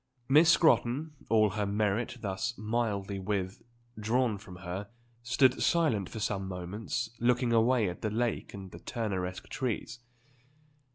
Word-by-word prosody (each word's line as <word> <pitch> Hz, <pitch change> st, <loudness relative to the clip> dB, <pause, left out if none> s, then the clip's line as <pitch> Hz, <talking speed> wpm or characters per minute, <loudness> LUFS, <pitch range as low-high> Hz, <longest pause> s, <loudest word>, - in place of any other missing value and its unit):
Miss 155 Hz, +4 st, +6 dB
Scrotton, 155 Hz, -3 st, +3 dB, 0.2 s
all 110 Hz, -2 st, +4 dB
her 105 Hz, 0 st, -1 dB
merit 105 Hz, +4 st, 0 dB
thus 100 Hz, +4 st, -2 dB
mildly 105 Hz, -3 st, -1 dB
withdrawn 110 Hz, +3 st, -2 dB
from 95 Hz, -2 st, -11 dB
her, 95 Hz, +3 st, -6 dB, 0.3 s
stood 120 Hz, +2 st, +3 dB
silent 130 Hz, -, +2 dB
for 110 Hz, -, -6 dB
some 95 Hz, -2 st, -2 dB
moments 100 Hz, +6 st, -4 dB
looking 120 Hz, 0 st, +2 dB
away 115 Hz, -1 st, +4 dB
at 90 Hz, -, -5 dB
the 110 Hz, -, 0 dB
lake 115 Hz, +2 st, -1 dB
and 95 Hz, -2 st, -9 dB
the -, -, -10 dB
Turneresque 95 Hz, -5 st, -3 dB
trees. 120 Hz, -2 st, -3 dB
110 Hz, 130 wpm, -30 LUFS, 100-120 Hz, 0.3 s, Miss